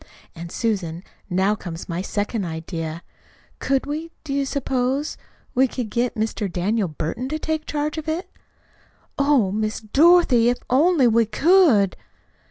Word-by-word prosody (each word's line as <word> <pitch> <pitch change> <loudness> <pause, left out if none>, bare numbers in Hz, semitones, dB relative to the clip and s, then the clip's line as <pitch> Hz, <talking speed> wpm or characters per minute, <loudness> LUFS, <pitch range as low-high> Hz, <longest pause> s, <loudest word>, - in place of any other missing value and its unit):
And, 170 +1 -8
Susan, 185 -8 -2 0.3
now 190 +3 +2
comes 175 -5 -7
my 170 +1 -3
second 205 +2 -2
idea. 165 -1 -5 0.6
Could 270 0 0
we 310 +3 -4
do 290 -3 -4
you 275 -1 0
suppose 265 +1 -1 0.4
we 260 +1 +4
could 240 -4 -5
get 240 +2 0
Mr. 215 -3 -2
Daniel 195 +4 0
Burton 165 - -4
to 310 - -2
take 315 0 -3
charge 300 +1 -2
of 315 0 -5
it?" 330 +4 -2 0.9
"Oh, 280 -9 +3
Miss 215 +1 -2
Dorothy, 270 0 +5
if 245 - 0
we 255 - +1
only 260 -8 +4
could!" 290 - +4
235 Hz, 145 wpm, -22 LUFS, 195-290 Hz, 0.9 s, Dorothy